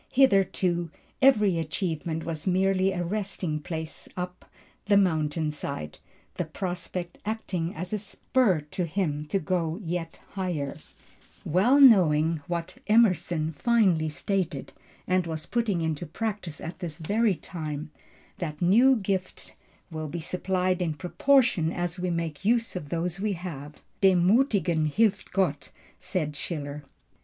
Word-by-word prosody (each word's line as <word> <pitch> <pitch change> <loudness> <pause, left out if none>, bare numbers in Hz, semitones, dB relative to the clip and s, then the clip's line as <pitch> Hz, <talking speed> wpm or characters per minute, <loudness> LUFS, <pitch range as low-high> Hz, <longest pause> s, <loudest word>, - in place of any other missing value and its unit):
Hitherto, 190 -8 +3 0.3
every 210 -10 +5
achievement 160 0 -3
was 165 +1 -4
merely 190 +1 +2
a 175 -2 -2
resting 185 -4 -2
place 160 0 -6
up 180 0 -6 0.4
the 205 -1 +5
mountainside, 150 - -1 0.4
the 180 - -1
prospect 175 +1 -5
acting 190 -6 -3
as 180 +4 -5
a 210 - 0
spur 200 -2 +1
to 180 - -1
him 155 -4 -1
to 175 - +1
go 170 -1 -1
yet 165 -1 -4
higher, 175 -8 -3 0.7
well 215 - +4
knowing 165 - +6
what 175 +1 -4
Emerson 180 -7 +3
finely 185 -5 +2
stated, 185 +3 -2 0.3
and 185 -1 +1
was 160 -1 -4
putting 225 -7 0
into 160 +1 -2
practice 195 -3 -4
at 165 0 -7
this 165 -4 -5
very 205 +5 +1
time, 155 -2 -6 0.5
that 155 -4 -4
new 235 +10 +5
gifts 190 -4 -3 0.4
will 155 -1 -4
be 165 +4 -5
supplied 185 +2 -1
in 165 -3 -1
proportion 180 - +2
as 175 -1 -3
we 180 0 -1
make 165 -2 -3
use 230 +1 +2
of 150 -6 -5
those 170 +2 -2
we 210 0 0
have. 150 -5 -7 0.2
Dem 185 -3 +5
Muthigen 185 - +3
hilft 205 +1 +1
Gott! 180 -7 0 0.3
said 170 -6 -2
Schiller. 145 -2 -5
175 Hz, 130 wpm, -27 LUFS, 160-195 Hz, 0.7 s, knowing